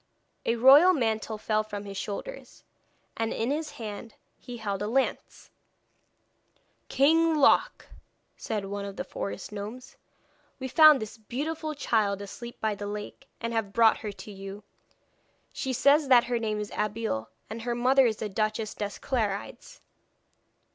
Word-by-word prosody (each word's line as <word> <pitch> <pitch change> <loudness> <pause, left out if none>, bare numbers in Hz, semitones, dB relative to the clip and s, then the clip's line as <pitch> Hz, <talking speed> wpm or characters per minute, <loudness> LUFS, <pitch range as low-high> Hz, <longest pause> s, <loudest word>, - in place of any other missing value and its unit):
A 230 - +2
royal 280 +10 +7
mantle 220 -5 -1
fell 215 0 0
from 205 -1 -7
his 200 -1 -8
shoulders, 210 - -7 0.5
and 225 0 -2
in 230 +4 -1
his 300 0 -3
hand 220 0 -8 0.2
he 245 -1 -8
held 200 -3 -3
a 205 - -1
lance. 265 +4 -2 1.4
'King 320 +4 +4
Loc,' 295 - +3 0.5
said 210 -3 -4
one 200 +1 -5
of 200 -1 -7
the - - -4
forest 200 - -6
gnomes, 210 +5 -8 0.6
'we 260 0 -4
found 310 -1 +7
this 215 +1 -10
beautiful 305 +7 -4
child 215 -7 0
asleep 235 +4 -9
by 220 -1 0
the 205 0 -6
lake, 210 +6 -7
and 230 0 -3
have 220 -3 -2
brought 230 0 +5
her 210 - -5
to 205 +1 -11
you. 195 +1 -9 0.9
She 265 - -3
says 280 +4 +4
that 250 -3 +6
her 240 -1 -1
name 215 -2 -2
is 210 0 -5
Abeille, 210 - -2 0.2
and 225 +2 -7
her 240 +1 -2
mother 255 +2 +4
is 220 -2 -1
the 215 - -3
Duchess 215 +1 -2
des 205 -1 -5
Clarides.' 215 -6 -3
225 Hz, 155 wpm, -27 LUFS, 205-260 Hz, 1.4 s, royal